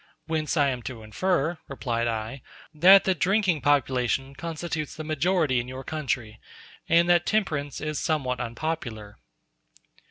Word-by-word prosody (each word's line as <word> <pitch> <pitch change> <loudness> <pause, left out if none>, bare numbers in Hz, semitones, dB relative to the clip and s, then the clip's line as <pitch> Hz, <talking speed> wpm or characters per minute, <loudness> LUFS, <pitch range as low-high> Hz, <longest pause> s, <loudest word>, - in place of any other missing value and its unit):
"Whence 160 0 -1
I 145 -2 +4
am 125 -2 -3
to 115 -4 -9
infer," 165 - 0
replied 120 -4 -2
I, 115 +3 -4 0.3
"that 185 +6 +7
the 190 - +2
drinking 185 -3 +1
population 135 -1 +1
constitutes 160 +1 -4
the 155 - -6
majority 155 -3 +1
in 120 - -4
your 130 +1 -7
country, 130 -8 -3 0.5
and 170 +1 +5
that 175 0 +4
temperance 150 - -1
is 155 -1 -3
somewhat 135 -6 -1
unpopular." 120 -4 -5
145 Hz, 135 wpm, -26 LUFS, 125-165 Hz, 0.5 s, that